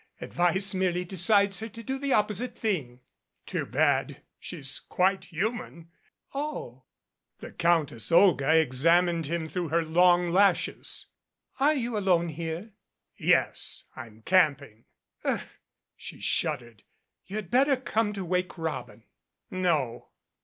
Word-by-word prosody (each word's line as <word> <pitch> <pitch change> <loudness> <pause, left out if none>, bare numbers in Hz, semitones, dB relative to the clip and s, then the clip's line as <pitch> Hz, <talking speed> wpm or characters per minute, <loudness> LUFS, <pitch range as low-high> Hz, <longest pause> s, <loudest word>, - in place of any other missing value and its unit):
Advice 185 +3 +1
merely 180 -1 0
decides 195 +2 +3
her 225 +1 -6
to 230 +2 -10
do 265 +4 -3
the 280 0 -2
opposite 215 +2 0
thing." 140 - -2 0.4
"It's - - -13
too - - -2
bad. 140 +3 +1 0.2
She's 140 -6 -6
quite 190 +1 0
human." 170 -3 -4 0.4
"Oh." 275 - -5 0.5
The - - -10
Countess 155 -10 0
Olga 165 -4 +5
examined 165 +4 +2
him 165 0 -2
through 175 +1 -3
her 165 +2 +1
long 175 +1 +4
lashes. 195 +1 +1 0.5
"Are 295 +3 +4
you 240 -5 -2
alone 175 -4 +2
here?" 165 +6 -5 0.4
"Yes. - - 0
I'm 110 -1 -11
camping." 140 - +1 0.4
"Ugh," - - -1 0.5
she - - -9
shuddered. 120 -4 -2 0.5
"You 200 - -7
had 205 -5 -5
better 270 +2 +4
come 225 -4 -1
to 195 -2 -5
'Wake 180 +1 -1
Robin'." 155 -9 -5 0.5
"No." 155 -10 -1
175 Hz, 125 wpm, -27 LUFS, 155-200 Hz, 0.5 s, Olga